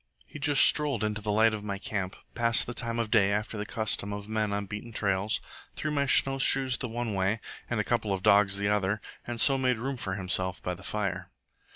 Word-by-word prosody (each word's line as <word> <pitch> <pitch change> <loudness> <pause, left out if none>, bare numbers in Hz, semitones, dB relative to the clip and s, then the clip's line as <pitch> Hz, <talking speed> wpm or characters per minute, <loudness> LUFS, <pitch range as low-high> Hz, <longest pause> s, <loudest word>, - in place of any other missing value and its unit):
He - - -11
just 145 -1 +5
strolled 145 -7 +3
into 105 0 -2
the 105 0 -2
light 110 +1 +4
of 105 -1 -5
my 100 -1 -3
camp, 95 -1 -4 0.2
passed 115 -1 +3
the 120 - -5
time 115 -1 -3
of 115 -2 -2
day 100 -4 +4
after 105 +2 -2
the 105 0 -4
custom 110 -3 -1
of 100 0 -7
men 110 -1 -1
on 100 0 -2
beaten 105 +4 -7
trails, 100 -1 0 0.4
threw 155 - -3
my 140 -1 0
snowshoes 135 -1 +4
the 125 - -5
one 115 -1 -3
way 95 +3 0 0.3
and - - -1
a - - +1
couple 105 - -1
of 95 -1 -2
dogs 100 -1 +4
the 100 0 -1
other, 105 0 0 0.3
and 120 -1 -4
so 135 +3 +5
made 125 -2 +1
room 130 +3 -4
for 95 -5 -3
himself 95 -1 0
by 90 - -2
the 90 - -11
fire. 100 0 -3
105 Hz, 225 wpm, -28 LUFS, 100-120 Hz, 0.4 s, just